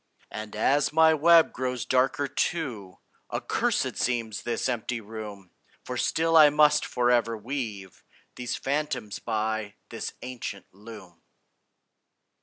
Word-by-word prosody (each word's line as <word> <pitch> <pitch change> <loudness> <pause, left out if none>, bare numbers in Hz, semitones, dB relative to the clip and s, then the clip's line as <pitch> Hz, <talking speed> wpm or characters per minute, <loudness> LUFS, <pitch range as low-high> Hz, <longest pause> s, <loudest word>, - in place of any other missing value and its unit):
And 110 0 -7
as 135 +6 +2
my 160 +1 +5
web 165 +2 +5
grows 125 -1 -3
darker 130 +2 +1
too, 125 - -3 0.3
Accursed - - -1
seems 115 -4 -1
this 120 - -2
empty 120 -1 -2
room; 105 -3 -9 0.3
For 125 - -5
still 165 +6 +1
I 155 -2 +9
must 150 0 +4
forever 120 -2 +1
weave 105 -6 -6 0.3
These 125 -1 -4
phantoms 135 -7 -3
by 110 -2 -2
this - - -5
ancient 120 -6 -6
loom. 100 -4 -13
120 Hz, 115 wpm, -27 LUFS, 110-140 Hz, 0.3 s, I